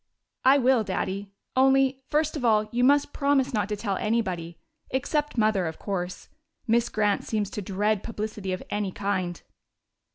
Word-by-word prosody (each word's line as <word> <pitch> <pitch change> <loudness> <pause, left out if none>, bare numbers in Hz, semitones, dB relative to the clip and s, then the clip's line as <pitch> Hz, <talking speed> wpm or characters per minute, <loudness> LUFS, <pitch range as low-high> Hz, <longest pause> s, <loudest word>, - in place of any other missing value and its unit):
"I 265 +2 +6
will, 255 -3 +3
Daddy. 195 0 -3 0.2
Only, 270 0 +4
first 305 +1 +1
of 290 - -4
all, 215 -2 +3
you 245 +1 +1
must 285 +2 +4
promise 280 -1 +1
not 210 -2 0
to 210 - -1
tell 200 -2 -2
anybody 185 -7 -1 0.3
except 295 +2 -1
Mother, 215 -5 +2
of 160 - -5
course. 180 -3 -4 0.4
Miss 235 +1 +2
Grant 210 -2 +1
seems 210 -3 -2
to 210 - -4
dread 205 +2 0
publicity 215 -3 -4
of 185 - -3
any 205 -2 -1
kind." 185 -3 -2
215 Hz, 160 wpm, -26 LUFS, 195-260 Hz, 0.4 s, I